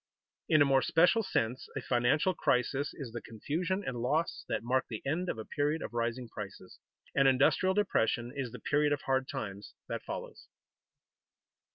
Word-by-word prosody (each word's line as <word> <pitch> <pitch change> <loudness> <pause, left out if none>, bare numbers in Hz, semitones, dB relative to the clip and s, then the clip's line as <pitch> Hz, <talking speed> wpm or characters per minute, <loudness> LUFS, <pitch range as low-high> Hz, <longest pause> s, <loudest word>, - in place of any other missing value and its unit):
_In 155 -2 +6
a - - +2
more 135 -1 +4
special 170 - +4
sense 125 - -1
a - - -2
financial 125 +9 +2
crisis 135 0 +1
is 135 -6 -7
the 120 0 -5
confusion 180 - -2
and 120 -2 -3
loss 150 +7 0
that - - -1
mark 130 +2 +1
the 110 -3 -5
end 170 +6 -1
of - - -2
a 110 - -6
period 150 +2 -1
of - - -6
rising 120 +1 -1
prices; 100 -4 -9 0.3
an 140 -1 +4
industrial 140 +8 +4
depression 120 - +1
is 130 -4 -3
the - - -7
period 150 0 +2
of 145 - -2
hard 130 0 +1
times 100 -1 -6
that - - -3
follows. - - -7
135 Hz, 175 wpm, -31 LUFS, 120-155 Hz, 0.3 s, In